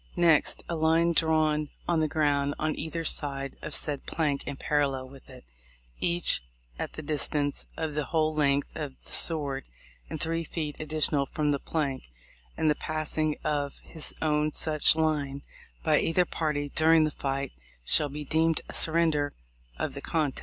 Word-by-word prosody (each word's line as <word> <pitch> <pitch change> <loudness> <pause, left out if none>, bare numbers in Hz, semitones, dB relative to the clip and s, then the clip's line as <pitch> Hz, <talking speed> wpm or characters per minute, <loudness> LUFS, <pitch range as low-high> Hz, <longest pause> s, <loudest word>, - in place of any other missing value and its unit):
Next, 170 -3 +3
a 170 - -2
line 165 +1 +3
drawn 155 -2 +2 0.2
on 170 -2 +2
the 155 - +2
ground 145 -2 +1
on 155 0 -1
either 165 +1 -3
side 140 -2 +2
of 150 - -2
said 145 -3 -1
plank 150 -4 0
and 140 -1 -4
parallel 140 -3 0
with 135 0 -14
it, - - -11 0.5
each 175 - +2 0.4
at - - -4
the 155 - -7
distance 145 -1 -1
of 160 -2 -2
the 150 -1 -1
whole 155 +2 +1
length 140 -2 +1
of 145 -4 -5
the - - -10
sword 140 -5 0 0.5
and 160 - -5
three 165 +1 -1
feet 155 -3 -4
additional 155 -2 +2
from 150 +1 0
the 140 - 0
plank; 140 -5 -2 0.5
and 160 - +1
the 150 - +5
passing 155 0 -1
of 145 -2 -1
his 160 -3 -4
own 150 -1 +1
such 155 -1 +3
line 145 -3 0 0.4
by - - +4
either 175 +2 +2
party 150 -4 -2
during 160 0 +5
the 155 - +1
fight 135 -1 -3 0.3
shall 150 - +3
be 150 +1 -6
deemed 160 +2 +2
a - - -8
surrender 160 -3 +2 0.4
of - - -2
the - - -6
contest. 155 -5 -1
150 Hz, 165 wpm, -28 LUFS, 145-160 Hz, 0.5 s, the